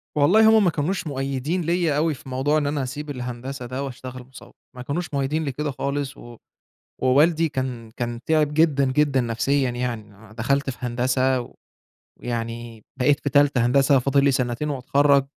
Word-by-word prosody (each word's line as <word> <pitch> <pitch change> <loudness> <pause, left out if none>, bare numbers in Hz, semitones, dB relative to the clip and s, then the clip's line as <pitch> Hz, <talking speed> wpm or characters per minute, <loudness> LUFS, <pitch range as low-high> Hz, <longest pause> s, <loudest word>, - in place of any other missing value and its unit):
والله 200 +10 +5
هُم 215 - +4
ما 180 - +4
كانوش 165 +3 -2
مؤيّدين 140 +4 -2
ليّا 170 -3 +1
أوي 160 +1 +1
في 135 -1 -12
موضوع 135 +4 +1
إن 145 -2 0
أنا 145 -1 -1
أسيب 145 +4 -6
الهندسة 125 0 -6
ده 130 +3 -4
وأشتغل 130 -1 -7
مصوّر، 120 -2 -14 0.2
ما 125 - -8
كانوش 150 +6 -4
مؤيّدين 140 +3 -1
لكده 145 +2 -3
خالص، 140 +1 -3
و 120 -1 -12 0.7
ووالدي 155 +6 +3
كان 125 -5 -4
كان 120 -1 -3
تِعب 155 -2 +2
جدًا، 150 -3 +3
جدًا 140 -1 +2
نَفْسيًا 125 +3 0
يعني، 120 -4 -4 0.2
أ - - -14
دخَلت 140 +5 0
في 125 - -8
هندسة 125 +1 0 0.7
ويعني 115 -1 -5 0.2
بقيت 140 +3 +3
في 145 - -2
تالتة 140 -3 +3
هندسة، 135 +2 +4
فاضل 140 +2 +2
لي 140 - +4
سنتين 125 +3 -1
وأتخرّج، 140 +1 +2
135 Hz, 170 wpm, -23 LUFS, 125-145 Hz, 0.7 s, والله